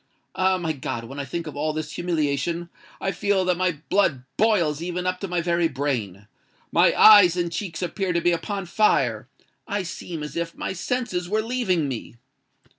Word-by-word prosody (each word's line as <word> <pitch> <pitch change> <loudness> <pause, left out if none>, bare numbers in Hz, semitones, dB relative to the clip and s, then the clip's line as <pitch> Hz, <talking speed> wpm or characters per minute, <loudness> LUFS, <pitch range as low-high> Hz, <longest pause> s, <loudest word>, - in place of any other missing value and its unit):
Ah! 185 0 +2
my 165 -3 -2
God—when 130 -1 -5
I 140 - -3
think 170 +5 -4
of 155 - -7
all 155 +2 -1
this 155 0 -4
humiliation, 170 0 -1 0.3
I 195 - -1
feel 195 +1 +1
that 180 0 +2
my 180 -4 -1
blood 150 -11 +2
boils 175 -9 +2
even 180 +1 -3
up 185 0 -1
to 195 - -4
my 175 -1 -1
very 170 0 +1
brain—my 115 - -1
eyes 195 -5 +8
and 170 -1 -1
cheeks 170 -1 -4
appear 185 +2 -2
to 170 - +1
be 175 - +2
upon 195 +3 -3
fire—I 165 - -1
seem 170 -2 -6
as 150 - -7
if 170 0 -3
my - - -3
senses 185 -3 -2
were 215 +2 +1
leaving 215 - 0
me!" 120 -3 -6
170 Hz, 175 wpm, -24 LUFS, 150-185 Hz, 0.3 s, eyes